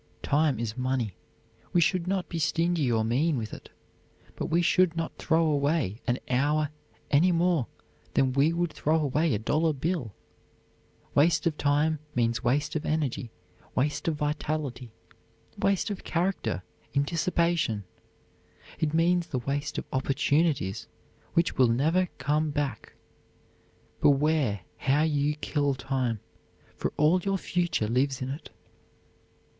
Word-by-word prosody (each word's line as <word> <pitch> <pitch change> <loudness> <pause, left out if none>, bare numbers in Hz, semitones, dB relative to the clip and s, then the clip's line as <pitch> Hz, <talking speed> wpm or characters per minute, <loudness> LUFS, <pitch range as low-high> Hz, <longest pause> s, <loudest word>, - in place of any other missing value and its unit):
Time 145 -2 +2
is 115 -2 -3
money. 130 -5 -1 0.6
We 175 - +5
should 170 +1 +2
not 190 -1 -1
be 165 - -4
stingy 160 -2 +1
or 110 -1 +2
mean 140 +7 +1
with 110 -2 -4
it, - - -10 0.7
but - - -3
we 170 +2 +2
should 180 -1 +3
not 165 -1 -3
throw 165 0 +2
away 145 - 0
an 120 0 +2
hour 145 +4 +1 0.4
any 160 +6 +5
more 170 -6 +2 0.5
than 130 -1 +3
we 140 +4 +3
would 170 -1 -1
throw 160 +2 +1
away 150 0 +1
a - - +1
dollar 155 +9 +1
bill. 145 - -2 1.0
Waste 165 +5 +3
of 165 -3 +1
time 150 +2 +1 0.2
means 115 -1 +1
waste 140 +7 +1
of 155 - -1
energy, 145 -6 -1 0.5
waste 145 +5 0
of 165 - +1
vitality, 150 -4 -3 0.7
waste 200 +2 +1
of 200 - -5
character 170 - -1 0.3
in 140 - +4
dissipation. 170 - 0 1.0
It 155 -1 0
means 175 +1 +3
the 135 - -2
waste 140 +4 -3
of - - -3
opportunities 135 - +1 0.5
which 170 -4 +1
will 130 - +7
never 160 +10 +2
come 150 +4 +1
back. 145 -2 -3 1.1
Beware 140 - +3 0.2
how 145 +2 +2
you 150 -1 +1
kill 145 -2 0
time, 130 -4 -2 0.5
for - - -2
all 160 +5 +4
your 195 +2 0
future 175 - -1
lives 130 +3 +1
in 130 - -4
it. 145 +5 -6
150 Hz, 140 wpm, -28 LUFS, 130-165 Hz, 1.1 s, will